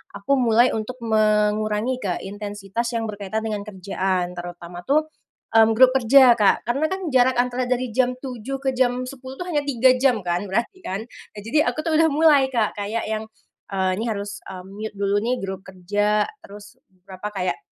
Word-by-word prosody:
aku 275 - -1
mulai 240 0 +4
untuk 225 +3 -4
mengurangi 215 +2 +1
ke 185 -4 -3
intensitas 205 +2 -4
yang 230 - -1
berkaitan 205 +1 -4
dengan 210 -2 -2
kerjaan. 190 -2 -2
Terutama 175 0 -8
tuh, 300 - +2 0.5
mmm, 225 0 +6
grup 255 +1 +7
kerja 260 0 +7
Kak 210 -4 +2
karena 275 +6 +1
kan 380 0 -3
jarak 255 0 +4
antara 250 +1 0
dari 255 0 0
jam 255 -1 +2
07:00 260 0 -5
ke 265 -1 0
jam 250 0 +1
10:00 260 0 -9
tuh 360 - -4
hanya 300 -4 +1
3 260 -2 +4
jam 255 -4 +3
kan 175 0 0
berarti 235 - -2
kan. 195 +2 -3 0.3
Nah, - - -7
jadi 300 +9 +1
aku 310 - -5
tuh 325 - 0
udah 325 - +4
mulai 290 -3 +4
Kak 230 -5 0
kayak 220 +3 -2
yang, 220 0 -2 0.5
eee, 190 -1 0
ini 225 - -2
harus, 205 -1 -5
eee, 185 -1 -8
mute 210 +2 -7
dulu 200 0 0
nih 240 +3 0
grup 190 -1 -5
kerja, 205 +3 0 0.2
terus 205 +1 -13
beberapa 190 +2 -9
kayak 185 -2 -2
220 Hz, 185 wpm, -22 LUFS, 200-255 Hz, 0.5 s, grup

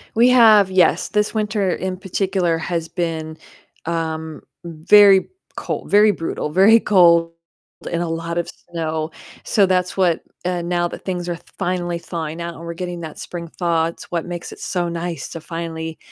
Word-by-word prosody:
We 240 +2 +5
have 220 -6 +6
yes, 185 -3 +3
this 210 0 0
winter 210 -3 0
in 185 0 -3
particular 185 -2 -1
has 165 0 -3
been, 160 -3 -3 0.5
um, 160 -2 -3 0.2
very 190 +4 +5 0.3
cold, - - -5
very 210 +1 +6
brutal, 165 -4 -4
very 200 +7 +6
cold 170 -5 +4 0.6
and 170 0 -1
a - - -3
lot 165 +1 -4
of 170 - -1 0.2
snow, 160 -2 -2 0.3
so 205 - +3
that's 185 0 0
what, 180 -4 +2 0.2
uh 180 -1 -1
now 175 0 0
that - - -9
things 180 -2 -3
are 175 - -2
th - - -17
finally 175 -1 -2
thawing 165 -1 -5
out 170 0 -5
and 165 - -11
we're 170 - -5
getting 175 0 -5
that 160 -2 -8
spring 170 -1 -7
thaw, 170 -2 +2
it's 165 - -10
what 170 -2 -1
makes 175 -1 -6
it - - -11
so 180 -2 -2
nice 170 0 -4
to 165 - -8
finally, 160 -1 -6
175 Hz, 175 wpm, -20 LUFS, 165-185 Hz, 0.6 s, have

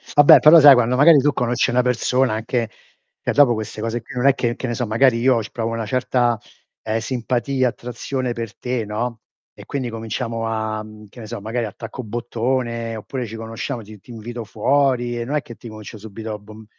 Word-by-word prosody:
Ah 145 - +8
beh, - - +9
però 160 +2 +8
sai, 145 -1 +10
quando 125 0 +2
magari 150 +3 +7
tu 145 +2 +2
conosci 120 -2 0
una 125 +1 +3
persona 125 0 +1
anche 115 +1 -2 0.5
e - - -1
dopo 140 -5 +5
queste 110 -1 -5
cose 115 +1 -2
qui 115 - -12
non 125 +1 -1
è 140 - +6
che, 120 -2 -1
che 130 - -5
ne 120 - -2
so 120 -2 -2
magari, 115 +2 +3
io 125 -1 +3
c 110 - -7
provo 115 -1 -3
una 115 -1 -3
certa, 120 -1 +1 0.4
eh, 110 +1 -2
simpatia, 125 +2 -1
attrazione 125 +2 -4
per 115 -2 -6
te, 125 -3 -2
no. 115 +2 -3 0.3
E - - -13
quindi 130 -4 -3
cominciamo 115 0 -4
a, 110 -1 -2
mhmm, 110 0 -13
che 120 - -15
ne 110 - -8
so, 115 -3 -6
magari 115 +2 -2
attacco 115 +5 -8
bottone, 115 0 -2
oppure 125 +4 -5
ci 110 - -8
conosciamo, 115 +2 -5
ti 105 0 -13
ti 120 - -15
invito 115 0 -7
fuori 120 +1 +1
e 120 - -3
non 145 +5 -2
è 150 - +1
che 120 - -11
ti 120 - -12
comincio 110 0 -10
subito 110 +1 -7
a 105 - -6
bom 110 +1 -13
120 Hz, 220 wpm, -21 LUFS, 110-125 Hz, 0.5 s, sai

